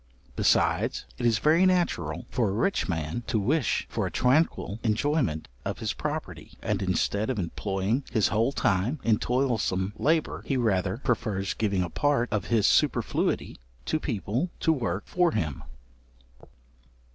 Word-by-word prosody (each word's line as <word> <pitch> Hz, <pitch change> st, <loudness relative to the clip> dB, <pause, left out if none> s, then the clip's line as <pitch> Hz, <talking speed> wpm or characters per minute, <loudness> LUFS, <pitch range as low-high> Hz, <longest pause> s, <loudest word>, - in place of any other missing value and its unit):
Besides, -, -, +2 dB
it -, -, +2 dB
is 115 Hz, -2 st, +3 dB
very 155 Hz, +9 st, +4 dB
natural 175 Hz, -, +1 dB
for 120 Hz, -5 st, +1 dB
a -, -, -2 dB
rich 115 Hz, -, 0 dB
man 80 Hz, +5 st, -2 dB
to 115 Hz, -, +1 dB
wish 130 Hz, +6 st, +1 dB
for -, -, -2 dB
a -, -, -6 dB
tranquil 125 Hz, -5 st, +1 dB
enjoyment 115 Hz, -, 0 dB, 0.2 s
of -, -, -3 dB
his -, -, -2 dB
property, -, -, -5 dB
and 105 Hz, -2 st, -1 dB
instead 100 Hz, +3 st, 0 dB
of 130 Hz, -, -1 dB
employing 95 Hz, +6 st, -1 dB
his 110 Hz, -4 st, +2 dB
whole 115 Hz, +4 st, +2 dB
time 120 Hz, +1 st, 0 dB
in 110 Hz, -2 st, +3 dB
toilsome 115 Hz, -7 st, 0 dB
labour, 160 Hz, +2 st, 0 dB
he 135 Hz, -, +1 dB
rather 95 Hz, -4 st, +1 dB
prefers 110 Hz, -7 st, -1 dB
giving 100 Hz, -4 st, 0 dB
a 85 Hz, -, -4 dB
part 140 Hz, -, +1 dB
of 105 Hz, -2 st, 0 dB
his 110 Hz, -2 st, +2 dB
superfluity -, -, +1 dB, 0.3 s
to 155 Hz, -, 0 dB
people 120 Hz, -, -2 dB
to 160 Hz, -, +3 dB
work 105 Hz, -, -2 dB
for 180 Hz, -2 st, +1 dB
him. 75 Hz, -5 st, -2 dB
110 Hz, 150 wpm, -27 LUFS, 95-135 Hz, 0.3 s, very